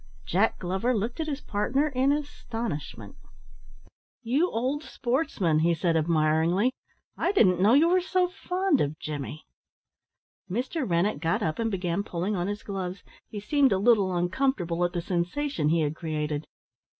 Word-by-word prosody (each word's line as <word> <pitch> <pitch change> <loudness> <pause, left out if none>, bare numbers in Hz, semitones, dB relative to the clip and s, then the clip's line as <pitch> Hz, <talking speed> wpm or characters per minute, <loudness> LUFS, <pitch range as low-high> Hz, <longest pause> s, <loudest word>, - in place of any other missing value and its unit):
Jack 200 +6 +2
Glover 190 +8 -1
looked 225 +7 -3
at 320 - -2
his 290 -2 -3
partner 265 +9 0
in 265 0 +2
astonishment. 235 - -4 1.1
"You 280 +10 +2
old 260 +6 -1
sportsman!" 240 - 0
he 170 +1 +3
said 165 0 0
admiringly. 160 +7 +2 0.4
"I - - +1
didn't 185 - +4
know 215 +6 +6
you 310 +4 +5
were 365 +1 +3
so 365 0 +1
fond 365 -3 0
of 145 +2 -1
Jimmy?" 150 0 -6 1.0
Mr. 255 - -2
Rennett 170 0 +1
got 165 +1 0
up 155 +4 -2
and 225 0 0
began 185 -2 -1
pulling 190 +1 -2
on 175 0 -1
his 205 +1 -4
gloves. 190 -1 -5 0.3
He 210 - -6
seemed 275 +5 +2
a 195 - +3
little 200 -3 +3
uncomfortable 175 -2 0
at 175 - 0
the 175 - -1
sensation 180 - -1
he 165 +1 +2
had 150 0 -1
created. 155 -2 -3
200 Hz, 155 wpm, -27 LUFS, 170-265 Hz, 1.1 s, know